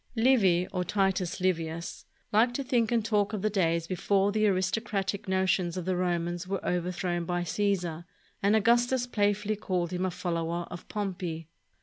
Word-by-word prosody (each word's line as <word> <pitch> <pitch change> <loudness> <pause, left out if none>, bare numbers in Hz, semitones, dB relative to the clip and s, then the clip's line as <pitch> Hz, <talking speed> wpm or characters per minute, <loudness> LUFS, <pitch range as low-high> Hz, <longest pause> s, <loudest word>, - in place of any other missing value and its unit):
Livy, 215 -8 +4
or 180 -1 0
Titus 190 -1 0
Livius, 170 -2 -2 0.3
liked 235 +3 +3
to 275 - -1
think 240 -3 +1
and 230 -3 +1
talk 210 -1 +1
of 210 -2 -3
the 215 - +1
days 170 -4 +1
before 195 +3 +1
the 215 +1 +2
aristocratic 195 +1 -1
notions 190 -2 +1
of 180 - -4
the 185 0 0
Romans 175 0 -1
were 195 0 -3
overthrown 175 0 -1
by 175 +1 -1
Caesar, 175 -3 -1 0.4
and 200 +2 +3
Augustus 240 +3 +3
playfully 205 -2 0
called 185 -4 -2
him 180 +1 -1
a 185 - +1
follower 170 -1 -2
of 175 - -8
Pompey. 175 -6 -4
185 Hz, 160 wpm, -29 LUFS, 175-210 Hz, 0.4 s, Livy